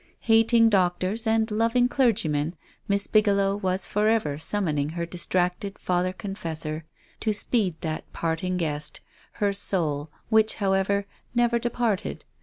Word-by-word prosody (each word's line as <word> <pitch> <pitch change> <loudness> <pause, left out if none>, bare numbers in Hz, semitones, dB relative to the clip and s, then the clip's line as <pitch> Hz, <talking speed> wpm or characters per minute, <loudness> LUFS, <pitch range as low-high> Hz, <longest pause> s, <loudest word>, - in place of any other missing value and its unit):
Hating 230 0 +5
doctors 190 +3 +1
and 220 0 +2
loving 230 +3 +2
clergymen. 175 - +1 0.3
Miss 200 0 +1
Bigelow 200 -2 +2
was 185 -2 -1
forever 210 -9 +1
summoning 155 -5 0
her 170 0 -2
distracted 180 +3 -1
father 180 0 0
confes 185 -5 -5
sor 155 0 -3 0.3
to 220 - 0
speed 205 -3 0
that 160 -1 -4
parting 170 +3 -2
guest 150 -3 -2 0.2
— - - -30
her 205 -1 0
soul, 160 -7 0 0.2
which, 220 -1 +4
however, 200 0 +1 0.3
never 240 0 +3
departed. 235 -4 -2
195 Hz, 130 wpm, -25 LUFS, 170-220 Hz, 0.3 s, Hating